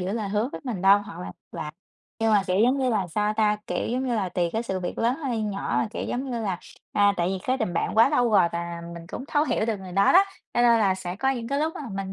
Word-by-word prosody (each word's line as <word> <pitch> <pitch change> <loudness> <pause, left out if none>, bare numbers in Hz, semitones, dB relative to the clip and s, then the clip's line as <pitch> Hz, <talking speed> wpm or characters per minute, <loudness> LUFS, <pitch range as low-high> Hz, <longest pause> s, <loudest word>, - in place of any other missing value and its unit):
giữ 185 +2 -2
lời 215 -3 -2
hứa 210 +5 0
với - - -6
mình 225 -8 -4
đâu 195 +1 +7
hoặc 205 0 -9
là 90 0 -6 0.2
là 150 - -5 0.5
nhưng 225 -1 +3
mà, 205 -2 +5
kiểu, 185 0 +1
giống 255 +3 +3
như 260 - +1
là 200 -5 0
sao 210 +5 0
ta? 210 -1 +3
Kiểu, - - -2
giống 255 +3 -1
như 245 - 0
là, 200 -5 0
tùy 175 -1 -1
cái 225 +1 -1
sự 190 -5 -3
việc 175 - -4
lớn 235 +3 +1
hay 235 -4 -1
nhỏ 200 -2 -2
mà, 220 - 0
kiểu, - - -4
giống 260 +2 -3
như 235 -1 -2
là, 195 -5 -2 0.3
à, 205 0 +4
tại 175 +1 +1
vì 190 0 -2
cái 255 +1 +1
tình 180 - -1
bạn 170 - -1
quá 225 +3 +7
lâu 245 -6 +2
rồi 190 -5 +5
và 170 0 -4
mình 170 0 -9
cũng 255 - -7
thấu 295 -1 +2
hiểu 225 -6 0
được 220 -2 0
người 185 -1 -9
đó 195 +2 +4
đó, 385 +2 +7 0.3
cho - - +2
nên 235 -1 +5
là 195 -3 +3
sẽ 185 -1 -6
có 265 +4 +1
những 235 -3 -3
cái 280 - 0
lúc 315 +2 -1
mà - - -6
mình 195 -1 -4
210 Hz, 300 wpm, -25 LUFS, 190-240 Hz, 0.5 s, đâu